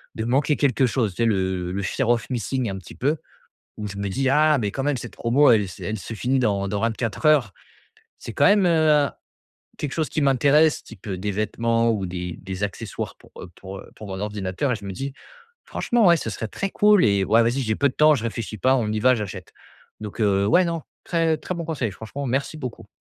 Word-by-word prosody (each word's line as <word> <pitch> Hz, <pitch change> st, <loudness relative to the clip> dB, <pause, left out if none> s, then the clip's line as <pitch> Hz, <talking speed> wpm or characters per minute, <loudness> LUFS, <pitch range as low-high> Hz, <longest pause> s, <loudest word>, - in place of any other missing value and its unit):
de 110 Hz, -, -3 dB
manquer 140 Hz, +5 st, +2 dB
quelque 135 Hz, -1 st, +2 dB
chose. 110 Hz, -3 st, 0 dB
Tu 105 Hz, -, -1 dB
sais, -, -, +3 dB
le 95 Hz, -2 st, -1 dB
fear 120 Hz, +5 st, -1 dB
of 120 Hz, -2 st, +1 dB
missing 125 Hz, 0 st, -1 dB
un 95 Hz, -, -4 dB
petit 90 Hz, -, -13 dB
peu 145 Hz, +5 st, 0 dB, 0.6 s
où 105 Hz, -, -4 dB
je 100 Hz, 0 st, -8 dB
me 100 Hz, 0 st, -2 dB
dis: 135 Hz, +7 st, 0 dB
«Ah, 150 Hz, +2 st, +4 dB
mais 105 Hz, -3 st, -1 dB
quand 135 Hz, -, -3 dB
même, 145 Hz, -1 st, 0 dB
cette 120 Hz, -, -8 dB
promo, 130 Hz, +5 st, +3 dB
elle 105 Hz, -4 st, +3 dB
se 90 Hz, -, -10 dB
elle 110 Hz, +1 st, -3 dB
se 115 Hz, -, -7 dB
finit 130 Hz, +4 st, 0 dB
dans 100 Hz, -5 st, 0 dB
dans 100 Hz, +1 st, -2 dB
24 115 Hz, -1 st, -2 dB
heures». 135 Hz, -11 st, +4 dB, 0.7 s
C'est 115 Hz, -, -8 dB
quand 140 Hz, -, +3 dB
même, 205 Hz, 0 st, +5 dB
heu, 160 Hz, -2 st, +3 dB
hein, 145 Hz, -2 st, +3 dB, 0.7 s
quelque 145 Hz, -2 st, -4 dB
chose 155 Hz, -5 st, -1 dB
qui 155 Hz, -, -1 dB
m'intéresse, 145 Hz, +3 st, +4 dB
qui 115 Hz, -, -12 dB
peut 95 Hz, -1 st, -6 dB
des 100 Hz, +3 st, -2 dB
vêtements 115 Hz, +3 st, +1 dB
ou 100 Hz, -4 st, -2 dB
des 90 Hz, -1 st, -5 dB
des 95 Hz, +1 st, -5 dB
accessoires 100 Hz, -2 st, -4 dB
pour, -, -, -21 dB
heu, -, -, -8 dB
pour, 95 Hz, 0 st, -9 dB
heu, -, -, -12 dB
pour 105 Hz, -, -10 dB
mon 95 Hz, -1 st, -5 dB
ordinateur 105 Hz, +4 st, -2 dB
et -, -, +1 dB
je 105 Hz, -, -10 dB
me 100 Hz, -, -4 dB
dis: 135 Hz, +8 st, -5 dB, 0.5 s
«Franchement, 235 Hz, -4 st, +1 dB
ouais, 170 Hz, -1 st, +6 dB
ce 115 Hz, -, -4 dB
serait 110 Hz, +3 st, -4 dB
très 195 Hz, -, -3 dB
cool 210 Hz, -, +5 dB
et 100 Hz, -2 st, +3 dB
ouais, 115 Hz, +4 st, +4 dB
vas-y, 120 Hz, +4 st, 0 dB
j'ai 110 Hz, -3 st, 0 dB
peu 140 Hz, +4 st, +2 dB
de -, -, -10 dB
temps, 155 Hz, 0 st, +5 dB
je 120 Hz, -, -4 dB
réfléchis 115 Hz, -1 st, -4 dB
pas, 130 Hz, +5 st, +3 dB
on 110 Hz, -5 st, 0 dB
y 110 Hz, -, -1 dB
va, 130 Hz, +4 st, +5 dB
j'achète». 95 Hz, -5 st, -6 dB, 0.5 s
Donc 105 Hz, 0 st, -8 dB
heu, 100 Hz, -2 st, +2 dB
ouais, 180 Hz, -, +4 dB
non, 165 Hz, -1 st, -2 dB, 0.2 s
très 165 Hz, -2 st, +1 dB
très 185 Hz, -, -5 dB
bon 170 Hz, -1 st, -4 dB
conseil, 140 Hz, -9 st, -2 dB
franchement, 110 Hz, +8 st, -7 dB
merci 135 Hz, +4 st, -2 dB
beaucoup. 130 Hz, -6 st, -7 dB
115 Hz, 235 wpm, -23 LUFS, 100-140 Hz, 0.7 s, ouais